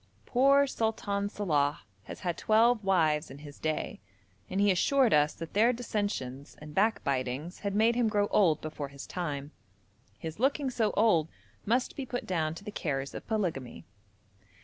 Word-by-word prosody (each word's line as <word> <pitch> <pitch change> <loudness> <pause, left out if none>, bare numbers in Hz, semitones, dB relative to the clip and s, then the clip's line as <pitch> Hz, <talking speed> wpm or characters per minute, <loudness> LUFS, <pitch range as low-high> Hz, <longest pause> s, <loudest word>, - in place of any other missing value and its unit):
Poor 275 +3 +4
Sultan 215 -5 -1
Salàh 150 -9 0 0.3
has - - -9
had 175 -2 -1
twelve 225 +1 +3
wives 160 -5 +2
in 135 - -10
his 145 0 -12
day, 155 -1 -2 0.5
and 190 - -2
he 205 0 +5
assured 255 +6 +3
us 150 0 +3
that 165 -1 -8
their 225 +4 +4
dissensions 205 - -4
and 150 0 -10
backbitings 145 - 0
had 200 -1 -3
made 225 +2 +4
him 235 -2 +2
grow 205 -1 +2
old 165 -7 +3
before 155 -2 -5
his 140 0 -10
time; 145 -5 -4 0.7
his 160 +3 -7
looking 270 +1 +1
so 225 -3 +1
old 170 -8 +4 0.4
must 245 +4 +1
be 275 - -4
put 245 - -4
down 160 -3 -1
to 185 - -10
the 210 - -6
cares 140 -8 -3
of - - -8
polygamy. 175 - -3
190 Hz, 165 wpm, -30 LUFS, 150-220 Hz, 0.7 s, he